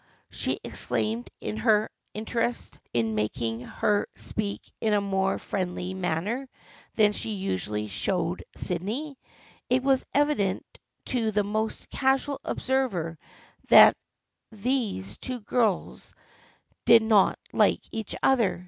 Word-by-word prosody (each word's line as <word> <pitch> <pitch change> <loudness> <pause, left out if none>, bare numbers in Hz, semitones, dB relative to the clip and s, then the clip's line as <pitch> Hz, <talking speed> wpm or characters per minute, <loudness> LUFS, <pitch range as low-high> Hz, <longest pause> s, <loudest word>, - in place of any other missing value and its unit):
" - - -38
she - - -2
exclaimed, 225 +3 -1 0.3
her 215 -1 +3 0.3
interest 230 +2 -2
in 115 -2 +1
it - - -3
making 115 +2 -1
her 205 +10 0
speak 205 -2 -3 0.2
in 220 -2 +2
a - - +4
more 195 -1 0
friendly 185 -1 -3
manner 190 +9 -2 0.5
than 210 -2 +5
she 220 - -3
usually 105 - -2
showed 170 - -2
Sydney. 230 - -3 0.5
It 255 +1 +2
was 270 -1 +3
evident 285 -10 +1 0.4
to 230 -3 0
the 210 0 +2
most 215 +2 -2
casual 270 +1 +1
observer 195 - -1 0.5
that - - +9 0.6
these 215 - -2
two 255 -1 -4
girls 215 -3 -1 0.7
did 230 -1 +7
not 215 -3 +4 0.2
like - - +3
each 220 -2 -4
other. 235 -10 +3
210 Hz, 120 wpm, -27 LUFS, 180-245 Hz, 0.7 s, that